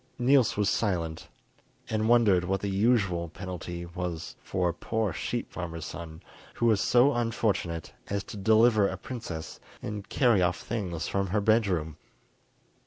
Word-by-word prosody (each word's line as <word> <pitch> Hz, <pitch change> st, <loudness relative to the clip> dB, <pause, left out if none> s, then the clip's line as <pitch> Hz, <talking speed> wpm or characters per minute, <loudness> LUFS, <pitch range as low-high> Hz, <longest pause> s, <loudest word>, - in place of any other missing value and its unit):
Niels 130 Hz, -2 st, +3 dB
was 105 Hz, -1 st, +2 dB
silent, 85 Hz, -7 st, -1 dB, 0.6 s
and 110 Hz, 0 st, 0 dB
wondered 110 Hz, -7 st, +5 dB
what 95 Hz, +2 st, -1 dB
the 100 Hz, -, -2 dB
usual 95 Hz, -5 st, +2 dB
penalty 85 Hz, -1 st, -6 dB
was 85 Hz, -1 st, -5 dB
for 90 Hz, -1 st, 0 dB
a -, -, -2 dB
poor 110 Hz, +2 st, -2 dB
sheep -, -, -4 dB
farmer's 85 Hz, -3 st, -5 dB
son 80 Hz, -2 st, -8 dB, 0.3 s
who 120 Hz, -, 0 dB
was 110 Hz, -4 st, +4 dB
so 125 Hz, +4 st, +4 dB
unfortunate 110 Hz, -8 st, -1 dB, 0.2 s
as 100 Hz, -1 st, -1 dB
to -, -, -9 dB
deliver 110 Hz, +1 st, +4 dB
a 95 Hz, -, -4 dB
princess 90 Hz, -8 st, -7 dB, 0.2 s
and 105 Hz, -1 st, -6 dB
carry 120 Hz, -7 st, +3 dB
off 90 Hz, -1 st, +1 dB
things 90 Hz, -9 st, -3 dB
from 100 Hz, 0 st, 0 dB
her 105 Hz, +4 st, +1 dB
bed 110 Hz, +1 st, +3 dB
room. 80 Hz, -5 st, -2 dB
100 Hz, 155 wpm, -28 LUFS, 85-110 Hz, 0.6 s, wondered